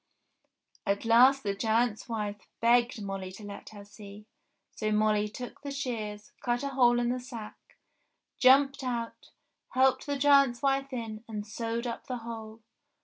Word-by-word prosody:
!" - - -49 0.3
At 200 +2 0
last 255 +4 +6
the 200 -1 0
giant's 225 +2 0
wife 210 -2 -4
begged 235 -1 +3
Molly 195 -1 -5
to 210 - -11
let 205 -1 -9
her 205 -2 -11
see, 205 0 -12 0.5
so 215 -1 -2
Molly 210 0 +2
took 245 +5 -8
the 285 - -6
shears, 225 -7 -4
cut 240 +1 -1
a 280 - -1
hole 245 -3 +4
in 240 0 0
the 250 +1 -1
sack, 235 -4 -10 0.6
jumped 275 +2 +5
out, 235 -2 -4 0.5
helped 260 +2 +3
the 285 -1 -1
giant's 275 -3 +4
wife 275 0 +1
in, 225 -3 -5
and 210 -2 -5
sewed 230 +2 -3
up 235 -1 -5
the 250 - -3
hole 225 -1 -8
230 Hz, 160 wpm, -29 LUFS, 210-255 Hz, 0.6 s, last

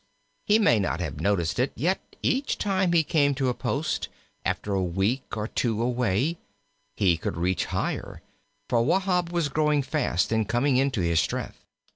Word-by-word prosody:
He 210 - +5
may 205 - +4
not 95 -3 -1
have 80 -7 -4
noticed 100 -1 0
it, 130 +2 +1
yet 180 +9 0 0.2
each 275 +2 0
time 190 -3 +1
he 170 -2 +4
came 145 -2 +2
to 130 -1 0
a - - 0
post, - - -2 0.3
after 100 - -2
a 95 - +1
week 95 +9 -1
or 105 0 -2
two 115 -2 -1
away, 125 - 0 0.6
he 90 -5 +3
could 80 - -4
reach 90 +2 0
higher, - - -3 0.4
for 120 -2 +2
Wahb 180 +4 +1
was 170 -3 +1
growing 150 0 +1
fast 130 - 0
and 110 -2 0
coming 125 +2 +2
into 130 -6 +1
his 85 -2 +2
strength. - - -3
125 Hz, 170 wpm, -26 LUFS, 100-155 Hz, 0.6 s, He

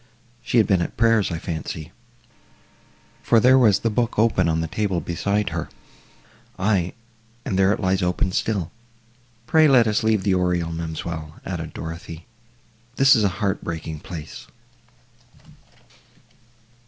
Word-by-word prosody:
She 120 - -1
had 110 - +5
been 95 -3 +2
at - - -4
prayers, 115 -3 +3
I 85 - -3
fancy, 80 -2 -6 1.3
for 115 - +4
there 130 +3 +5
was 110 -6 +5
the 115 - -1
book 120 +1 -1
open 105 -6 +2
on 80 0 0
the 80 - -2
table 95 +2 -1
beside 100 +5 -1
her—aye, 95 -2 -5 0.5
and 95 - -1
there 95 +1 +4
it - - -1
lies 95 -1 0
open 90 +1 0
still! 95 -3 -1 0.7
Pray, 155 +3 +5
let 130 -5 +5
us 105 -1 +1
leave 110 -3 +1
the 95 - +2
oriel, 90 -2 0
ma'amselle," 80 -1 -6
added 85 -4 -5
Dorothée, 80 0 -7 0.7
"this 135 +1 +6
is 110 - +2
a 100 - +3 0.2
heart 95 - -1
breaking 80 -2 -5
place!" 80 -2 -9
95 Hz, 140 wpm, -22 LUFS, 85-110 Hz, 1.3 s, this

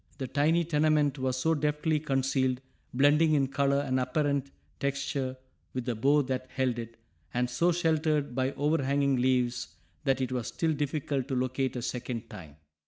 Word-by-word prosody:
The 135 - -3
tiny 150 +6 +2
tenement 150 -2 +2
was 130 -1 0
so 160 +5 +2
deftly 150 +1 0
concealed, 135 -3 0 0.3
blending 150 +4 +4
in 140 -2 +3
color 140 0 +2
and 130 -2 0
apparent 140 +1 0 0.3
texture 140 -1 -2 0.4
with 125 -2 -2
the 125 - 0
bough 140 +6 +3
that 130 0 -3
held 130 -2 -1
it, 115 0 -8 0.4
and 125 0 +2
so 170 +8 +2
sheltered 155 -5 +1
by 130 +2 0
overhanging 140 -2 +1
leaves 125 -1 0 0.3
that 135 -1 +2
it 130 -1 -1
was 125 -2 -2
still 160 +7 0
difficult 145 -2 -2
to 135 - -2
locate 130 +1 -1
a 120 - -3
second 120 -2 -4
time. 80 -5 -10
135 Hz, 165 wpm, -29 LUFS, 130-150 Hz, 0.4 s, blending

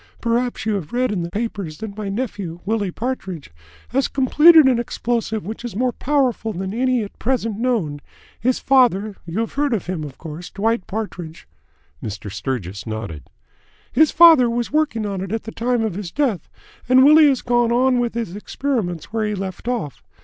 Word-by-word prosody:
Perhaps 240 +1 -1
you 220 - +1
have 190 -4 -4
read 250 -1 +1
in 195 -4 -1
the 170 - -4
papers 200 -6 -4
that 210 +1 -7
my 210 -2 -4
nephew, 200 -6 -4
Willie 210 -2 0
Partridge, 190 - -5 0.4
has 270 +3 +1
completed 300 +4 +6
an 255 -3 +3
explosive 235 -3 -2
which 220 +4 -6
is 240 -5 -6
more 250 +3 +1
powerful 255 -5 0
than 190 +2 -4
any 250 0 +1
at 200 - -10
present 230 -4 -1
known. 205 - -1 0.4
His 250 +3 +1
father 215 -6 +2
you 170 +6 -3
have 230 - -4
heard 285 -3 +1
of 200 - -4
him, 180 -3 -3
of 140 -3 -8
course 165 +2 -8
Dwight 225 0 -1
Partridge." 185 -6 -6 0.6
Mr. 105 -1 -6
Sturgis 100 -2 -4
nodded. 105 - -6 0.6
"His 315 -1 +4
father 320 -7 +7
was 235 0 -2
working 295 -8 0
on 195 -2 -3
it 190 0 -5
at 225 0 -2
the 225 - -7
time 240 0 0
of 220 -4 -1
his 190 -1 -5
death, 255 - -1 0.4
and 260 +1 +7
Willie 305 +1 +8
has 265 -3 0
gone 240 -1 +2
on 250 +1 +3
with 240 -1 -1
his 225 -6 -3
experiments 210 - -3
where 220 -1 0
he 210 - -2
left 190 +2 -6
off. 230 - -3
225 Hz, 185 wpm, -21 LUFS, 185-250 Hz, 0.6 s, Willie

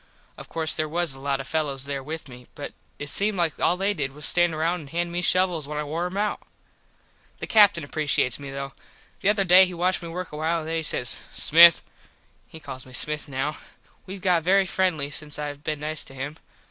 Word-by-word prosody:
Of - - -12
course 160 -1 0
there 155 0 -1
was 170 -2 0
a 135 - -8
lot 135 0 -1
of - - -6
fellos 140 -4 -2
there 140 -1 -3
with 155 +3 -7
me 125 -1 -13
but 145 - -7 0.2
it 145 - -6
seemed 205 0 +1
like 170 -3 0
all 180 - +2
they 195 +2 +1
did 140 -7 -3
was 150 +1 -12
to - - +3
stand 175 -2 +2
round 170 +3 0
and 145 -4 -11
hand 170 +2 -2
me 175 +1 -2
shovels 180 -4 +1
when 150 0 -5
I 150 - -1
wore 160 +4 -3
em 185 +2 -7
out. 210 0 -1 1.0
The - - -5
Captin 205 -7 +5
appresheates 140 -5 0
me 140 -1 -8
though. 135 0 -6 0.5
The 195 - +2
other 205 -1 +3
day 185 +1 +7
he 180 - -7
watched 180 +2 0
me 170 - -7
work 180 +1 -6
awhile 160 +2 -1
and 155 - -8
then 165 0 -1
he - - -1
says 125 -5 0 0.2
"Smith." 170 +2 +7 0.6
He 160 - -11
calls 135 -4 -7
me 130 - -14
Smith 150 +2 0
now. 135 +3 -2 0.5
We 190 +2 -6
got 180 -3 +2
very 190 +3 +3
friendly 175 -6 -1
since 150 +1 -3
I 150 -1 -4
been 150 +1 -5
nice 155 0 -1
to 135 - -11
him. 145 +4 -6
155 Hz, 230 wpm, -24 LUFS, 145-175 Hz, 1.0 s, day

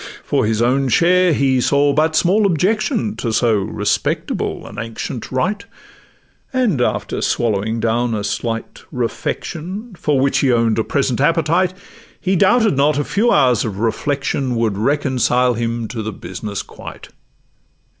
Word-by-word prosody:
'For - - 0
his 110 +1 +1
own 135 +3 +2
share—he 165 -4 +3
saw 140 +2 +3
but 155 +2 +1
small 200 +5 +3
objection 210 - 0
To 115 - -2
so 110 -1 +2
respectable 105 0 -2
an - - -8
ancient 115 +1 -6
rite; 200 +11 -1 0.9
And, 235 - +1
after - - -1
swallowing 110 0 0
down 115 +1 0
a 105 - -3
slight 115 +2 -4
refection, 175 - -4
For 150 -6 0
which 135 +1 +2
he 135 - +2
own'd 115 -2 +2
a - - +2
present 135 -1 0
appetite, 165 +4 +2 0.4
He 190 -1 0
doubted 215 - +3
not 140 +2 +2
a 145 - +1
few 225 +9 +1
hours 125 -6 +3
of 105 -4 -4
reflection 130 +3 -1
Would 115 -3 0
reconcile 125 0 +1
him 115 0 -2
to 115 - -4
the 110 +1 -4
business 100 +2 -6
quite. - - -11
130 Hz, 145 wpm, -18 LUFS, 115-170 Hz, 0.9 s, share—he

